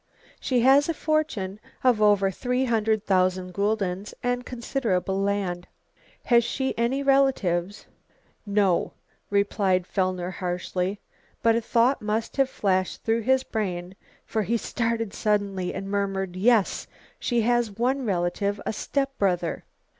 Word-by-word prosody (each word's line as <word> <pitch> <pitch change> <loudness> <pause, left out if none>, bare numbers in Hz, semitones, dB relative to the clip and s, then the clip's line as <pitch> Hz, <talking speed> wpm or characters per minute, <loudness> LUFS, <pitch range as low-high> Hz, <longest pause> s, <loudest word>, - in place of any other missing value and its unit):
"She 250 -3 +1
has 275 +5 +5
a 330 - 0
fortune 295 -13 -1 0.2
of 245 -4 +3
over 205 -2 +4
three 250 +5 -1
hundred 220 -3 +1
thousand 185 -1 +1
guldens, 200 -1 -1
and 245 0 0
considerable 225 -7 -1
land." 195 -3 -1 0.6
"Has 235 -1 +4
she 265 +3 -2
any 250 +4 0
relatives?" 210 -10 +1 0.6
"No," 200 -3 +1 0.4
replied 200 -2 +1
Fellner 185 -2 -1
harshly. 180 +2 -3 0.4
But 230 -1 +4
a 230 - +1
thought 235 +4 +2
must 215 +4 -2
have 270 -1 +3
flashed 185 -5 -1
through 225 +1 +1
his 260 +3 +2
brain 185 -6 -3 0.3
for 220 - -1
he 230 +3 0
started 230 -2 -2
suddenly 200 -4 0
and 195 - -5
murmured, 195 -2 -2
"Yes, 215 +1 +2 0.3
she 240 -2 +1
has 240 0 +2
one 260 +3 +1
relative, 200 0 -1
a - - -1
step 275 +4 -2
brother." 180 -4 0
210 Hz, 130 wpm, -25 LUFS, 190-240 Hz, 0.6 s, has